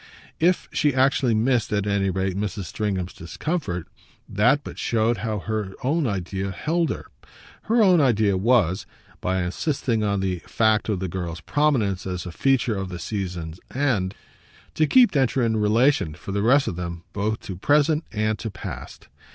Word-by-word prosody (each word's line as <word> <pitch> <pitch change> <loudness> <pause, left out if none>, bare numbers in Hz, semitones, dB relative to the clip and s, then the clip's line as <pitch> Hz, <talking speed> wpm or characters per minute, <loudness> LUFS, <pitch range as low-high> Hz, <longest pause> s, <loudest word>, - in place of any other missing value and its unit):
If 175 +3 +2
she 145 -4 +1
actually 130 -2 +3
missed, 120 +1 +1
at 100 -1 0
any 100 -1 +1
rate, 95 0 -1
Mrs. 105 0 -3
Stringham's 95 -2 -3
discomfort, 90 - -4 0.4
that 125 +8 +2
but - - -8
showed 115 0 +1
how 110 -1 -2
her 105 -1 -3
own 145 +2 +1
idea 95 -1 -3
held 160 - 0
her. - - -4 0.6
Her 230 0 +4
own 180 -5 +5
idea 110 -7 +3
was, 95 -3 +2 0.3
by 95 0 0
insisting 115 - -1
on 100 -1 +1
the 95 -2 -1
fact 110 -1 +2
of 100 -4 0
the 95 - -1
girl's 85 -1 -5
prominence 120 -12 +1
as 90 -2 -4
a 90 - -5
feature 130 +1 +1
of 95 -1 -4
the 90 - -6
season's 90 -3 -4 0.2
end, 115 -9 0 0.6
to 155 - +2
keep 245 - +6
Densher 135 -2 +2
in 110 -1 +1
relation, 110 - +2
for 95 - -8
the 100 +1 0
rest 130 +6 +4
of - - -2
them, 85 -1 -5
both 105 +1 -1
to 95 - -6
present 150 - +2
and 110 0 -1
to 115 - -4
past. - - -8
105 Hz, 170 wpm, -24 LUFS, 95-130 Hz, 0.6 s, keep